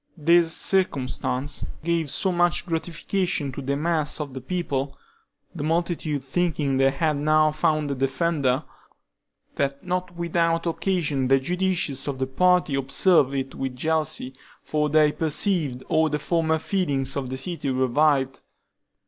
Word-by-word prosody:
This 165 +1 +4
circumstance 140 -6 -1 0.2
gave 165 -2 0
so 190 +7 0
much 175 0 +1
gratification 170 -2 -2
to 135 - -6
the 140 +1 -1
mass 155 -1 0
of 145 -3 -5
the 130 - -6
people 140 -3 -3 0.6
(the 160 -5 -5
multitude 160 -3 -1
thinking 145 -2 0
they 135 0 +4
had 150 +2 0
now 155 +1 +3
found 155 -1 0
a - - +1
defender), 135 +1 0 0.9
that 140 0 -1
not 180 -1 -3
without 170 0 0
occasion 165 -6 0
the 135 +1 +4
judicious 175 -3 -1
of 140 -2 -2
the 130 - -1
party 180 +3 +2
observed 140 +1 +3
it 135 0 -3
with 135 -1 -4
jealousy, 155 -2 -1 0.3
for 150 -1 0
they 155 0 +4
perceived 155 -4 0
all 160 -1 +2
the 150 - -1
former 160 +1 0
feelings 145 -7 -1
of 135 -3 -3
the 130 - -4
city 160 0 -3
revived. 130 +1 +1
150 Hz, 140 wpm, -24 LUFS, 135-170 Hz, 0.9 s, This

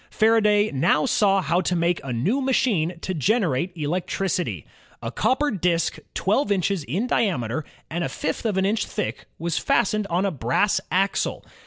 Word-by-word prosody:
Faraday 215 -1 +3
now 150 - +2
saw 200 -7 +3
how 175 +2 +1
to 180 - 0
make 170 +1 +1
a 135 - -5
new 185 - 0
machine 210 -11 +1
to 185 - -3
gen 210 - +2
erate 160 +1 0
electricity. 180 +4 -2 0.4
A - - -3
copper 290 +3 +1
disk 170 -4 0 0.2
twelve 205 +4 +1
inches 195 -3 0
in 185 - -1
diameter 155 - 0 0.2
and 170 +2 -3
a 135 - -2
fifth 160 +4 -3
of 205 -3 -1
an 190 - +2
inch 215 +3 0
thick 210 - -4
was 170 0 -1
fastened 215 -2 +1
on 180 +2 0
a 195 - +1
brass 170 - +1
axle. 195 +2 0
190 Hz, 170 wpm, -24 LUFS, 165-210 Hz, 0.4 s, Faraday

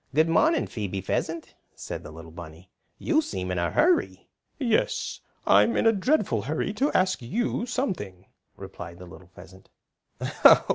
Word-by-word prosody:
"Good 155 +2 +4
morning, 315 - +3
Phoebe 100 -3 -4
Pheasant," 160 - -3 0.2
said - - -6
the - - -10
little 80 +1 -11
bunny. 85 +2 -11 0.3
"You 315 -1 +2
seem 90 - -4
in 90 - -1
a 85 - 0
hurry." 345 +2 +1 0.3
"Yes, 235 -6 0 0.3
I'm 235 - +5
in - - +1
a 225 - +6
dreadful 200 - +1
hurry 155 - -2
to 270 +8 +1
ask 185 -4 +2
you 235 - -2
something," 170 - -3 0.3
replied 85 -1 -9
the 90 - -11
little 90 +1 -14
pheasant. 95 +1 -15
135 Hz, 150 wpm, -26 LUFS, -, 0.3 s, a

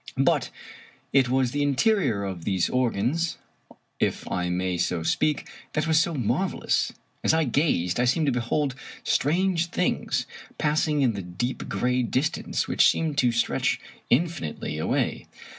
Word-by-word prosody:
But - - +2 0.6
it 135 -3 +4
was 130 -1 +2
the 145 - -1
interior 145 - +2
of 95 -4 -5
these 95 -2 0
organs 130 +6 0 0.3
— - - -24 0.3
if - - -1
I 90 0 -1
may 90 +1 -1
so 85 -1 0
speak 150 - 0
— - - -27
that 155 0 0
was 160 -1 +4
so 170 -1 +1
marvelous. 125 -7 0 0.3
As - - +3
I 160 - +3
gazed, 120 - +1
I 125 - +3
seemed 150 +6 +2
to 140 - +2
behold 125 +3 0 0.3
strange 170 +3 +1
things 180 +1 -1 0.3
passing 150 -1 +1
in 120 -3 +3
the 100 - -4
deep 95 +9 -4
gray 125 +1 +1
distance 130 +5 -1
which - - +5
seemed 155 -3 0
to 125 -3 +4
stretch 115 0 0 0.3
infinitely 120 - -1
away. 80 - -1
130 Hz, 155 wpm, -26 LUFS, 100-155 Hz, 0.6 s, which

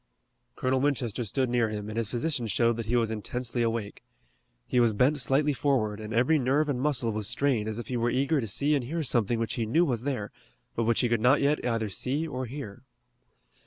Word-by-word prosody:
Colonel 130 +1 0
Winchester 125 -5 0
stood 130 +5 0
near 120 -2 +1
him 105 -1 -5
and 110 - -6
his 115 -2 -1
position 125 0 -1
showed 115 +3 +2
that 115 -2 -4
he 120 - +1
was 115 -2 +1
intensely 120 +3 -3
awake. 115 -3 -2 0.6
He 125 - +1
was 115 -2 +4
bent 135 +8 +2
slightly 140 +4 +2
forward, 120 -7 0
and 110 0 -7
every 130 +8 +3
nerve 140 +4 +1
and 125 -3 -1
muscle 130 -5 +1
was 105 -1 -2
strained 120 -6 0
as 110 - -4
if 120 - -5
he 125 - -2
were 120 +1 +1
eager 140 +4 +1
to 115 - -4
see 145 +9 +1
and 140 -4 +1
hear 160 +5 -2
something 120 -4 +1
which 115 0 -2
he 110 - -1
knew 165 +10 +3
was 120 -7 -1
there, 125 -6 -3 0.4
but 115 - 0
which 115 0 +2
he 125 - +2
could 115 -2 0
not 125 +5 +5
yet 145 +2 +1
either 115 -2 0
see 140 - -2
or 130 -3 -4
hear. 120 -6 -8
120 Hz, 225 wpm, -28 LUFS, 115-140 Hz, 0.6 s, not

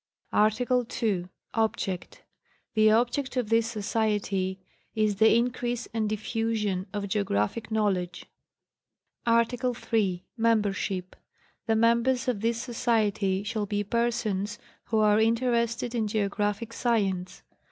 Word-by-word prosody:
ARTICLE 245 +3 +2 0.2
II. 190 -5 +1 0.3
Osserct. 195 -5 -2 0.5
The 215 -1 +5
object 245 +5 +1
of 240 -4 0
this 225 0 +3
Society 205 -3 -1 0.4
is 215 -2 +1
the 220 +1 +6
increase 245 0 -1
and 220 -2 0
dijfusion 215 -3 -1
of 205 -1 -3
geo 205 +1 0
graphic 105 - -1
knowledge. 190 -5 -1 1.0
ArtTIcLE 240 +2 +2 0.2
III]. 190 -5 +1
Memepersutr. 200 -5 0 0.5
The 225 - +3
members 235 +3 +2
of 235 -5 0
this 230 +1 0
Society 215 -5 0
shall 210 0 -2
be 205 0 -1
persons 210 -2 -1 0.3
who 225 - 0
are 210 0 +4
interested 235 +1 +1
in 225 -3 0
geographic 210 +1 -1
science. 195 -7 -1
220 Hz, 115 wpm, -27 LUFS, 200-230 Hz, 1.0 s, the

